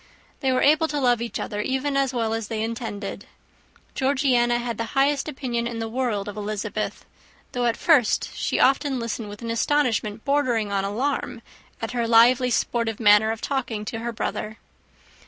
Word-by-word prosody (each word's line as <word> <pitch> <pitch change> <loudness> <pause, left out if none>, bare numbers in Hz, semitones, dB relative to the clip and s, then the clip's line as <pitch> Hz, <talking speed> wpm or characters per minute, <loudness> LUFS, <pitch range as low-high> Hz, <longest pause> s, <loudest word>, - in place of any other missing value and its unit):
They 265 -2 +1
were 255 - +2
able 310 +2 +4
to 295 -2 -2
love 245 -3 +2
each 235 - -4
other, 210 0 -3
even 265 +4 -1
as 275 -2 +2
well 230 -3 -1
as 225 -2 -3
they 220 -1 -2
intended. 220 -3 -5 0.7
Georgiana 260 -3 +2
had 235 -2 -4
the 230 - -1
highest 280 +2 +2
opinion 245 -4 -2
in 235 -1 -5
the 225 0 -3
world 225 -4 -2
of 205 - -6
Elizabeth; 210 0 -4 0.5
though 245 -1 0
at 230 - 0
first 290 -10 +3
she - - -1
often 270 0 +3
listened 230 -2 -4
with 205 +3 -10
an 230 - -3
astonishment 230 -4 0
bordering 255 -7 +1
on 195 -1 0
alarm 245 +2 -2 0.4
at 225 - -2
her 240 -2 -1
lively, 240 +2 +5
sportive 230 -2 0
manner 210 0 +5
of 225 0 -3
talking 245 -6 -2
to 225 - -4
her 235 +1 -3
brother. 220 -1 -4
235 Hz, 175 wpm, -24 LUFS, 220-260 Hz, 0.7 s, lively